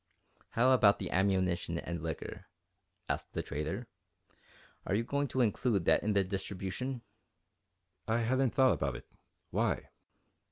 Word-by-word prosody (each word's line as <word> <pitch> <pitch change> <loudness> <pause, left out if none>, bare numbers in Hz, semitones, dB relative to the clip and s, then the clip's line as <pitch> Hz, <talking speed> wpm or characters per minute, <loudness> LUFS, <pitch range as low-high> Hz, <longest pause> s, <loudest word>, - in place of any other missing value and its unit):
"How 125 +3 +5
about 110 -6 +6
the 95 - -5
ammunition 95 -3 +1
and 85 -1 -4
liquor?" 80 0 -5 0.6
asked - - -3
the - - -2
trader. 75 +2 -3 1.0
"Are 100 - 0
you 115 - +1
going 140 +4 0
to 130 +1 0
include 110 -4 +1
that - - +5
in 105 0 0
the 100 -1 +3
distribution?" 100 +6 -4 1.0
"I 115 +1 +2
hadn't 130 +2 +1
thought 130 -2 +6
about 70 -2 -1
it 65 - -8 0.5
why?" - - 0
100 Hz, 135 wpm, -32 LUFS, 90-125 Hz, 1.0 s, about